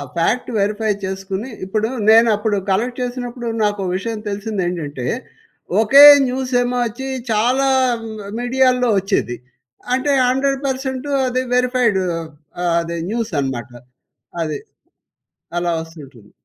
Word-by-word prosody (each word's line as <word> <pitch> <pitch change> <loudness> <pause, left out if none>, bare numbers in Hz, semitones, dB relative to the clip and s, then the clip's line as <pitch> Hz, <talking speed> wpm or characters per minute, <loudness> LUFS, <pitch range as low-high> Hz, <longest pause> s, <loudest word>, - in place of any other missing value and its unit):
Fact 190 +9 0
verify 210 +2 0
చేసుకొని, 190 +4 -4 0.2
ఇప్పుడు 215 +3 -1 0.2
నేనప్పుడు 220 -2 +4
కలెక్ట్ 240 +7 0
చేసినప్పుడు, 245 -1 -4 0.2
నాకో 205 -1 0
విషయం 220 +3 -3
తెలిసిందేంటంటే, 180 - -3 0.8
ఒకే 275 +6 +8 0.2
న్యూసేమో 250 -1 0
వచ్చి 240 +4 -5 0.2
చాలా 250 +6 +2 0.4
మ్ - - -6 0.3
మిడియాల్లో 250 0 +2
వచ్చేది. 185 -10 -1 0.6
అంటే 265 +3 +1 0.2
100% 265 0 -1 0.2
అది 255 +1 -1
వెరిఫైడూ 250 -5 +2 0.6
ఆహ్, 175 -1 +1
అదే 170 0 -5
న్యూసనమాట. 140 - -2 0.7
అది. 155 -2 -3 1.0
అలా 175 0 0
వస్తుంటుంది. 140 -10 -13
220 Hz, 100 wpm, -19 LUFS, 190-250 Hz, 1.0 s, ఒకే